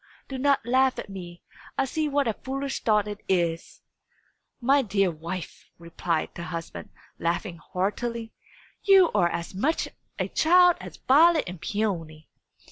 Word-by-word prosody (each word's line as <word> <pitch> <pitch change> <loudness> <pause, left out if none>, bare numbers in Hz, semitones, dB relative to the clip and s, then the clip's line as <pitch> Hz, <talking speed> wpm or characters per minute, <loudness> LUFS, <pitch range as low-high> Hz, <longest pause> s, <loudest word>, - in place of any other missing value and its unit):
Do 265 -1 -5
not 280 -2 +2
laugh 260 +2 +3
at 200 - -7
me; 175 -2 -9 0.3
I 270 - +2
see 305 +3 -1
what 285 -2 +1
a 225 - +1
foolish 270 +4 -4
thought 210 -2 +2
it 205 0 -6
is!" 170 -3 -1 0.8
"My 275 +3 +4
dear 195 -5 +1
wife," 165 +3 -7
replied 170 -1 -2
the - - -8
husband, 165 0 -6 0.3
laughing 170 +2 -2
heartily, 225 +7 -3 0.5
"you 385 -3 +6
are 175 - +3
as 170 +2 -5
much 275 +13 0 0.3
a - - -1
child 355 +2 +5
as - - -9
Violet 315 +4 +5
and 180 -3 -8
Peony." 165 -8 -3
210 Hz, 145 wpm, -26 LUFS, 175-275 Hz, 0.8 s, you